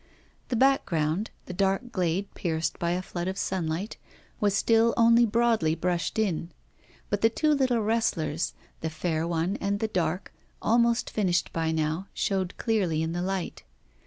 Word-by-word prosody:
The 245 Hz, -, 0 dB
background 200 Hz, -, +2 dB, 0.2 s
the 185 Hz, -, -6 dB
dark 195 Hz, +6 st, 0 dB
glade 185 Hz, -1 st, -1 dB
pierced 160 Hz, -2 st, -2 dB
by 170 Hz, -, 0 dB
a 180 Hz, +1 st, -2 dB
flood 175 Hz, -1 st, -4 dB
of 190 Hz, +1 st, -3 dB
sunlight 180 Hz, +2 st, -2 dB, 0.4 s
was 205 Hz, -2 st, +2 dB
still 230 Hz, +2 st, +3 dB
only 235 Hz, 0 st, +6 dB
broadly 225 Hz, -8 st, +2 dB
brushed 175 Hz, +3 st, -1 dB
in. 180 Hz, -6 st, 0 dB, 0.6 s
But -, -, 0 dB
the 225 Hz, -, +5 dB
two 305 Hz, +7 st, +1 dB
little 260 Hz, -5 st, +2 dB
wrestlers 170 Hz, -8 st, 0 dB, 0.3 s
the 160 Hz, -, -2 dB
fair 160 Hz, 0 st, -2 dB
one 170 Hz, +4 st, 0 dB
and 200 Hz, 0 st, 0 dB
the 220 Hz, -, 0 dB
dark 180 Hz, -3 st, -2 dB, 0.3 s
almost 235 Hz, +1 st, +2 dB
finished 180 Hz, -5 st, 0 dB
by 165 Hz, -1 st, 0 dB
now, 160 Hz, +4 st, -1 dB
showed 190 Hz, -2 st, -1 dB
clearly 185 Hz, -9 st, +1 dB
in 160 Hz, -, -2 dB
the 175 Hz, +1 st, -2 dB
light. 190 Hz, -1 st, -3 dB
190 Hz, 160 wpm, -27 LUFS, 165-225 Hz, 0.6 s, only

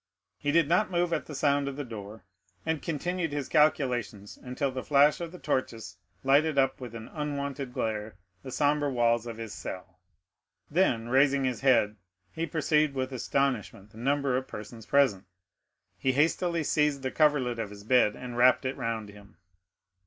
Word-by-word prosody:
He 145 Hz, -, 0 dB
did 165 Hz, -1 st, +4 dB
not 180 Hz, +6 st, +2 dB
move 175 Hz, -1 st, 0 dB
at -, -, -2 dB
the 150 Hz, -, -7 dB
sound 140 Hz, 0 st, +1 dB
of 140 Hz, -, -4 dB
the 145 Hz, -, -4 dB
door, 110 Hz, -3 st, -9 dB, 0.4 s
and 160 Hz, -2 st, -1 dB
continued 170 Hz, +1 st, -2 dB
his 145 Hz, -2 st, -3 dB
calculations 125 Hz, -, +1 dB
until 130 Hz, +2 st, -3 dB
the 130 Hz, 0 st, -4 dB
flash 145 Hz, +4 st, +4 dB
of 170 Hz, -1 st, -5 dB
the 180 Hz, -, -10 dB
torches 115 Hz, -, -3 dB, 0.3 s
lighted 145 Hz, +3 st, +3 dB
up 135 Hz, -1 st, +2 dB
with 120 Hz, -2 st, -7 dB
an 115 Hz, 0 st, -8 dB
unwonted 140 Hz, -3 st, -4 dB
glare 110 Hz, -3 st, -3 dB, 0.3 s
the 135 Hz, -, -8 dB
sombre 145 Hz, +2 st, +1 dB
walls 120 Hz, -2 st, +1 dB
of 115 Hz, -1 st, -6 dB
his 115 Hz, -2 st, -6 dB
cell; 90 Hz, -1 st, -8 dB, 0.7 s
then, 125 Hz, -9 st, +1 dB
raising 135 Hz, +1 st, +3 dB
his 130 Hz, -2 st, -1 dB
head, 115 Hz, -6 st, +3 dB, 0.3 s
he 165 Hz, +1 st, -3 dB
perceived 150 Hz, -1 st, +1 dB
with 130 Hz, 0 st, -2 dB
astonishment 125 Hz, -6 st, -2 dB
the 110 Hz, -, -13 dB
number 140 Hz, +1 st, +1 dB
of 130 Hz, +1 st, -2 dB
persons 110 Hz, +1 st, -9 dB
present. 135 Hz, -10 st, +3 dB, 0.7 s
He 130 Hz, -, +1 dB
hastily 165 Hz, +3 st, +1 dB
seized 150 Hz, -2 st, +1 dB
the 130 Hz, -, -2 dB
coverlet 140 Hz, -6 st, +2 dB
of 110 Hz, -3 st, -3 dB
his 100 Hz, 0 st, -11 dB
bed, 110 Hz, -2 st, +3 dB
and 125 Hz, -1 st, -7 dB
wrapped 125 Hz, +2 st, +4 dB
it 130 Hz, -, -1 dB
round 110 Hz, -2 st, -3 dB
him. 100 Hz, -3 st, -16 dB
135 Hz, 175 wpm, -28 LUFS, 115-150 Hz, 0.7 s, did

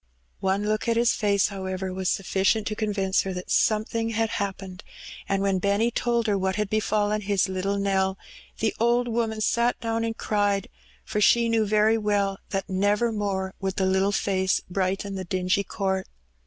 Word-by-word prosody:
One 195 Hz, +2 st, 0 dB
look 215 Hz, +1 st, -1 dB
at 230 Hz, 0 st, +2 dB
his 235 Hz, 0 st, +3 dB
face, 200 Hz, -2 st, +2 dB
however, 190 Hz, -1 st, -4 dB
was 190 Hz, 0 st, -1 dB
suflGicient 195 Hz, +3 st, +1 dB
to 215 Hz, -, -2 dB
convince 200 Hz, -3 st, 0 dB
her 190 Hz, -, -4 dB
that 180 Hz, -, -6 dB
something 225 Hz, +1 st, +1 dB
had 225 Hz, -1 st, 0 dB
happened, 195 Hz, -2 st, -4 dB, 0.5 s
and 195 Hz, 0 st, +1 dB
when 195 Hz, -1 st, +1 dB
Benny 200 Hz, +5 st, +1 dB
told 235 Hz, 0 st, 0 dB
her 205 Hz, -3 st, +1 dB
what 190 Hz, 0 st, 0 dB
had 210 Hz, -1 st, -2 dB
befallen 215 Hz, -1 st, +1 dB
his 200 Hz, -1 st, +1 dB
Uttle 195 Hz, +1 st, -2 dB
Nell, 190 Hz, -1 st, +1 dB, 0.4 s
the 220 Hz, -, 0 dB
old 240 Hz, +1 st, +2 dB
woman 225 Hz, -2 st, -1 dB
sat 235 Hz, +3 st, +1 dB
down 230 Hz, -1 st, -1 dB
and 225 Hz, 0 st, -3 dB
cried; 205 Hz, -2 st, 0 dB, 0.4 s
for 210 Hz, -, -2 dB
she 235 Hz, +3 st, +5 dB
knew 225 Hz, -2 st, +2 dB
very 215 Hz, +2 st, +3 dB
well 200 Hz, -2 st, 0 dB
that 195 Hz, 0 st, -2 dB
never 205 Hz, +4 st, +1 dB
more 195 Hz, -3 st, -2 dB
would 195 Hz, -1 st, -2 dB
the 195 Hz, -, 0 dB
Uttle 190 Hz, +1 st, +2 dB
face 190 Hz, -1 st, +1 dB
brighten 195 Hz, +2 st, -2 dB
the 190 Hz, -1 st, -4 dB
dingy 185 Hz, +2 st, 0 dB
court. 190 Hz, -1 st, -2 dB
200 Hz, 180 wpm, -25 LUFS, 190-215 Hz, 0.5 s, she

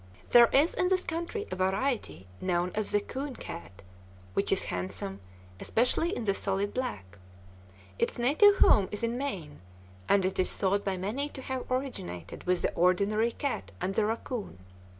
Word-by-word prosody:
There 240 Hz, -1 st, +9 dB
is 290 Hz, +8 st, +3 dB
in 365 Hz, -, +1 dB
this 370 Hz, 0 st, +2 dB
country 340 Hz, +5 st, -3 dB
a -, -, -2 dB
variety 190 Hz, -, -1 dB, 0.2 s
known 180 Hz, -1 st, 0 dB
as 215 Hz, -1 st, -1 dB
the 205 Hz, -, +2 dB
"coon 265 Hz, +5 st, -5 dB
cat," 85 Hz, +3 st, -9 dB, 0.5 s
which -, -, +1 dB
is -, -, +3 dB
handsome, 95 Hz, +1 st, -4 dB, 0.4 s
especially 250 Hz, +8 st, +1 dB
in -, -, -3 dB
the 200 Hz, -2 st, +2 dB
solid 195 Hz, +1 st, -1 dB
black. 105 Hz, -, -4 dB, 0.8 s
Its -, -, 0 dB
native 305 Hz, -, +5 dB
home 195 Hz, -, +5 dB
is 210 Hz, +3 st, -4 dB
in 230 Hz, +1 st, 0 dB
Maine, 200 Hz, -, -4 dB, 0.5 s
and 195 Hz, -2 st, +4 dB
it 185 Hz, -, -2 dB
is 185 Hz, -, +2 dB
thought 200 Hz, +1 st, +1 dB
by 195 Hz, -2 st, -1 dB
many 225 Hz, +11 st, -2 dB
to 265 Hz, -, -9 dB
have 260 Hz, -1 st, -4 dB
originated 170 Hz, -, -4 dB
with 180 Hz, -1 st, +1 dB
the -, -, 0 dB
ordinary 200 Hz, +6 st, +2 dB
cat 250 Hz, -, -3 dB
and 190 Hz, -, -1 dB
the 215 Hz, -, +2 dB
raccoon. 225 Hz, -, -4 dB
205 Hz, 170 wpm, -29 LUFS, 180-260 Hz, 0.8 s, There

